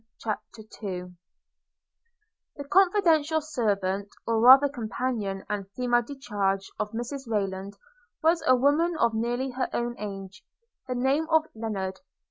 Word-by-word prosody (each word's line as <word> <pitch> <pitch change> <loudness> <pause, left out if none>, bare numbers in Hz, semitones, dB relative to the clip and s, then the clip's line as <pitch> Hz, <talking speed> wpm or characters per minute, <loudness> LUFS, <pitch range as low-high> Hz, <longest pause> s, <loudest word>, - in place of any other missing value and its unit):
CHAPTER 220 0 -5 0.2
II 180 -3 -5 1.4
THE 285 - -6
confidential 335 -4 +3
servant, 200 -9 -1 0.2
or 230 -1 +1
rather 265 +5 +8
companion 230 -6 -3
and 205 -2 -4
femme 240 -1 +2
de 280 +4 -8
charge, 195 -6 -2
of 210 - -1
Mrs 245 +3 -5
Rayland, 195 -2 -2 0.5
was 330 +1 +3
a 255 - +7
woman 300 +6 +2
of 235 -5 +2
nearly 240 +4 -1
her 255 +1 -2
own 240 0 -2
age, 195 -2 -7 0.5
of 250 - -1
the 245 - -2
name 290 +5 +1
of 320 -1 +4
Lennard. 200 -4 -4
235 Hz, 135 wpm, -27 LUFS, 200-280 Hz, 1.4 s, rather